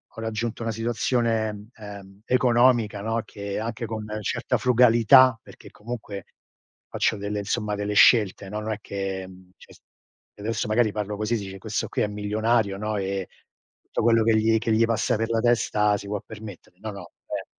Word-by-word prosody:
ho 115 - -7
raggiunto 115 +1 -3
una 115 - -1
situazione, 115 -2 -1
ehm, 100 -2 -11
economica, 120 -4 +3
no, 115 +1 -1
che, 100 0 -5
anche 115 +1 -4
con 110 -1 -5 0.2
certa - - -1
frugalità, 125 0 +6
perché - - -14
comunque 105 -4 -7 0.6
faccio 110 - 0
delle 105 +1 -3
insomma, 105 0 -2
delle 105 0 -3
scelte, 105 -3 +5
no, 105 +2 -4
non 110 +1 -3
è 105 - -2
che, 95 -2 -4 0.3
cioè - - -17 0.7
adesso 105 +1 -2
magari 110 -1 +2
parlo 105 -1 -3
così, 110 +2 -1
dice: 95 -2 -5
"Questo 105 +2 -3
qui - - 0
è - - +1
milionario 105 0 0
,no, 105 +1 -3
e 95 -1 -2 0.5
tutto - - -4
quello 115 0 +4
che 110 -1 +3
gli 110 +1 +3
che 115 0 -1
gli 115 +1 +4
passa 115 -1 0
per 115 +1 -2
la 115 -1 +1
testa, 105 -3 +2
si 100 - -9
può 105 -1 -3
permettere." 105 -4 -11
No, 110 -1 -5
no, 90 -4 -10
cioè - - -5
110 Hz, 175 wpm, -25 LUFS, 105-115 Hz, 0.7 s, frugalità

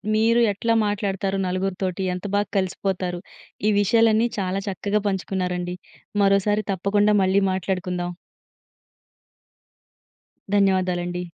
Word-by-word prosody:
మీరు 230 +2 +3
ఎట్లా 230 +4 0
మాట్లాడతారు 195 -1 -1
నలుగురితోటి? 185 0 -2
ఎంత 180 - -8
బా 205 - +3 0.2
కలిసిపోతారు? 185 -1 -2 0.5
ఈ - - +4
విషయాలన్నీ 225 +2 +4
చాలా 190 +1 -1
చక్కగా 200 +2 -1
పంచుకున్నారండి. 180 -2 -2 0.5
మరోసారి 200 +2 +2
తప్పకుండా 205 +3 +2
మళ్ళీ 190 +2 +3
మాట్లాడుకుందాం. 180 -1 -2 2.4
ధన్యవాదాలండి. 180 -3 +1
195 Hz, 90 wpm, -23 LUFS, 180-205 Hz, 2.4 s, ఈ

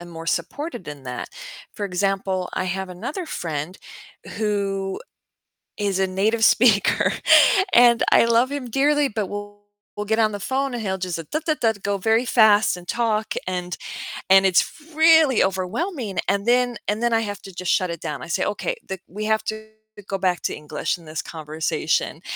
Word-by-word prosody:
and 175 0 -11
more 165 0 -9
supported 290 - -3
in 145 -2 -8
that. 125 -1 -5 0.4
For 205 - -5
example, 190 -1 -1
I 185 - -1
have 190 +1 -3
another 240 - -5
friend 160 - -4 0.6
who 200 -3 -1 0.8
is 200 -2 -1
a 190 - +3
native 215 +4 +1
speaker 220 -4 +4 0.6
and 235 -1 +6
I - - +6
love 235 +3 +3
him 270 -4 -4
dearly, 290 +3 +2
but 215 -2 -2
we'll 205 +1 -8 0.3
we'll 210 - -3
get 220 +2 0
on 215 -1 +3
the 205 - -5
phone, 265 +5 -1
and 240 - -3
he'll, 190 -2 -2
just, 180 -2 -3
"Da, 310 - 0
da, 310 - +2
da" 225 -1 +3
go 200 0 0
very 225 +5 +2
fast 215 -5 +4
and 175 - -13
talk 220 -1 0
and 180 -2 -3 0.5
and 195 0 +7
it's 185 -1 +5 0.3
really 320 -5 +5
overwhelming, 200 - -2
and 200 +1 0
then 245 -1 +2
and 210 +3 -1
then 235 -1 +2
I 225 - +4
have 205 -2 -5
to, 195 - -10
just, 180 0 -2
shut 185 - +1
it 170 - -7
down. 150 -3 -5
I - - -8
say, - - 0
"Okay, 355 - -2
the 190 - -5
we 210 +4 -6
have 220 0 +1
to 215 0 -5 0.4
go 195 - -2
back 185 -2 0
to - - -1
English 150 +2 -3
in 170 - -17
this 155 0 -4
conversation," 155 -1 -2
205 Hz, 185 wpm, -22 LUFS, 185-230 Hz, 0.8 s, and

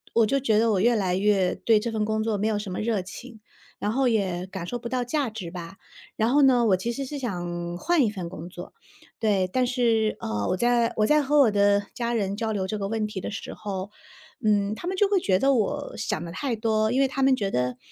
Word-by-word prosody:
我 230 -1 +5
就 275 +6 +1
觉 220 -5 +2
得 225 0 +3
我 195 - +1
越 235 +5 +3
来 190 -4 0
越 195 -1 +2
对 225 -2 +3
这 235 +2 -3
份 215 -1 -1
工 220 0 -1
作 220 -2 0
没 205 - -1
有 215 -2 0
什 205 -2 -6
么 180 - -4
热 215 -2 0
情， 220 +5 -10 0.4
然 210 - -1
后 265 +3 +2
也 190 -6 0
感 190 -3 -6
受 245 - -3
不 235 - -6
到 255 0 -1
价 265 +1 -1
值 205 -6 -6
吧。 175 +1 -8 0.4
然 220 +1 +1
后 285 +3 +4
呢， 255 -3 +5
我 190 -3 +4
其 230 +6 -3
实 275 +3 -4
是 290 +2 -6
想 175 -7 -4
换 330 - +3
一 215 - 0
份 185 -5 -6
工 170 -2 -8
作。 180 - -10 0.5
对， 200 -4 +1
但 255 +3 +2
是， 230 -3 +1
呃， 105 -2 -2
我 185 - +1
在 240 +1 +2
我 215 - +3
在 300 +3 +4
和 295 +2 +3
我 270 -5 +6
的 205 0 +3
家 240 -1 -2
人 200 -3 -1
交 225 0 -1
流 190 -3 -2
这 215 - -3
个 200 -1 -3
问 220 0 -1
题 210 -2 -5
的 - - -5
时 215 - -6
候， 195 -2 -5 0.6
嗯， 205 0 +2
他 345 - -7
们 375 - -1
就 405 +2 +3
会 400 -2 +3
觉 190 - +1
得 275 +4 +3
我 285 +6 -1
想 220 - -2
得 170 - -7
太 240 +7 -2
多， 220 -1 +1
因 260 +2 +2
为 270 - +4
他 270 +1 -2
们 265 0 +5
觉 200 -5 -2
得 125 0 -1
215 Hz, 275 characters per minute, -25 LUFS, 195-245 Hz, 0.6 s, 我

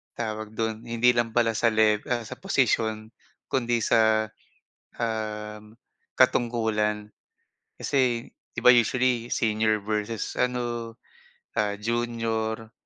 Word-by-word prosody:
tawag 110 -1 -4
do'n, 110 +1 -3
hindi 115 +1 +3
lang 120 -2 0
pala 115 -1 +3
sa 115 - +3
lev 110 -1 +3
ah, 120 -1 0
sa - - -8
posisyon 110 - 0 0.4
kundi 120 -3 +1
sa, 110 -1 +4 0.7
um, 105 -1 -4 0.4
katungkulan. 105 -3 +1 0.7
Kasi, 125 -3 +1 0.3
'di - - -1
ba - - +8
usually 120 0 +2
senior 110 -1 +1
versus 110 0 -2
ano, 120 -2 -2 0.6
ah, 105 -1 +1
junior. 115 -1 -2
115 Hz, 105 wpm, -26 LUFS, 110-120 Hz, 0.7 s, ba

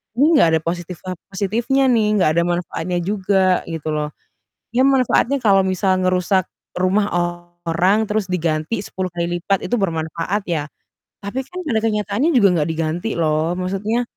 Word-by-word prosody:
ini 300 +7 +4
enggak - - +6
ada - - -2
positif 175 +1 -4
a 185 - -3 0.2
positifnya 230 +8 +1
nih, 225 -3 +3
enggak 180 - +4
ada - - +3
manfaatnya 175 0 -2
juga 190 -1 +1
gitu 160 -2 -4
loh. 150 0 -2 0.6
Ya 250 - +4
manfaatnya 270 0 +3
kalau 200 -5 +4
misal 185 0 +1
ngerusak 185 0 +1 0.3
rumah 185 +3 +2 0.6
orang 185 +6 +2
terus 210 -1 0
diganti 170 +2 -1
10 185 -1 -4
kali 175 0 -2
lipat 195 +2 0
itu 245 - 0
bermanfaat 165 +2 -2
ya, 155 -4 -1 0.6
tapi 240 +7 -4
kan 365 +4 -7
pada 265 -10 0
kenyataannya 210 - +1
juga 215 -6 +6
enggak 150 0 0
diganti 165 +6 -2
loh, 160 +1 0
maksudnya 195 +6 -1
185 Hz, 155 wpm, -20 LUFS, 170-215 Hz, 0.6 s, enggak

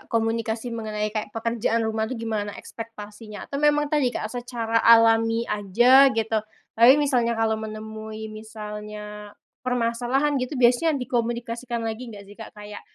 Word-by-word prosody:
komunikasi 225 +1 -1
mengenai 215 -2 -3
kayak 215 0 -5
pekerjaan 230 0 0
rumah 220 0 -1
tuh 255 - -4
gimana 215 -3 -3
ekspektasinya? 215 -2 -9
Atau 280 +1 -5
memang 295 0 +2
tadi, 285 -4 +3
Kak, 220 -2 -4
secara 235 -2 -1
alami 225 0 +5
aja 240 +7 +5
gitu? 225 -3 0 0.3
Tapi 240 +5 +7
misalnya 245 -6 +1
kalau 220 -1 0
menemui 220 0 -7
misalnya 210 -1 -8 0.2
permasalahan 250 +3 0
gitu, 255 +3 -3
biasanya 250 +6 +3
dikomunikasikan 235 -1 -3
lagi 225 +2 -4
gak 205 -2 -10
sih, 200 - -14
Kak? 220 0 -11
Kayak 210 0 -9
225 Hz, 140 wpm, -24 LUFS, 215-245 Hz, 0.3 s, Tapi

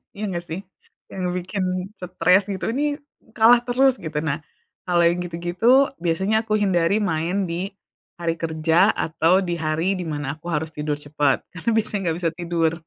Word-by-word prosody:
Iya 210 - -5
enggak 175 -1 -4
sih? 165 +3 -5 0.5
Yang 190 - -5 0.2
bikin 190 +2 -3 0.3
stres 180 +1 +3
gitu, 200 +1 -3
ini 290 +4 0 0.4
kalah 235 +1 +6
terus 255 +1 +3
gitu. 155 -2 -7
Nah, 150 -2 -1 0.5
kalau 175 -1 +3
yang 170 +1 +3
gitu-gitu, 180 +10 +2
biasanya 190 +5 0
aku 215 - 0
hindari 200 -1 +2
main 180 +1 -1
di 185 +4 -4 0.4
hari 170 -1 -1
kerja 165 +4 +2
atau 165 +4 +2
di 175 -2 -2
hari 165 +5 0
di 180 - -4
mana 145 -1 -4
aku 160 - -16
harus 155 +1 -2
tidur 150 -1 -2
cepet, 145 -1 0
karena 180 +4 -7
biasanya 215 -1 0
enggak 160 - 0
bisa 165 - +2
tidur. 170 -2 0
175 Hz, 170 wpm, -23 LUFS, 160-200 Hz, 0.5 s, kalah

